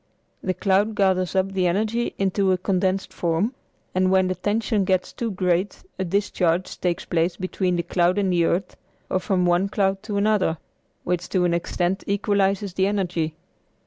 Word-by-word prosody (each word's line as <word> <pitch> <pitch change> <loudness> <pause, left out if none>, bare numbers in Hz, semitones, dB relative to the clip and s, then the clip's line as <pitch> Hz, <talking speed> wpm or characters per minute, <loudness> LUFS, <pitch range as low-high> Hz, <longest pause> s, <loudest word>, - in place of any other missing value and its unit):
The 185 -1 -1
cloud 200 +4 +2
gathers 190 -2 +1
up 190 0 +1
the 185 -2 +1
energy 215 +6 0
into 195 0 +1
a 185 - +3
condensed 190 +1 -1
form, 175 +8 0 0.4
and 185 0 +2
when 190 -1 +3
the - - +1
tension 210 +1 0
gets 185 -1 0
too 235 - -3
great 185 0 -1 0.2
a - - +1
discharge 185 -2 0
takes 175 -2 -1
place 170 +1 0
between 185 -1 -1
the 170 - -1
cloud 175 +2 +1
and 195 -3 +1
the 170 -1 +3
earth 180 +3 -1 0.4
or 185 - +2
from 185 -1 0
one 175 +3 +2
cloud 195 -1 0
to 215 -2 -4
another, 200 -5 +2 0.5
which 180 0 -2
to 180 -2 +2
an 175 - +2
extent 175 +2 -1
equalizes 200 -1 +1
the 190 +1 +2
energy. 180 -6 -1
185 Hz, 175 wpm, -23 LUFS, 180-200 Hz, 0.5 s, a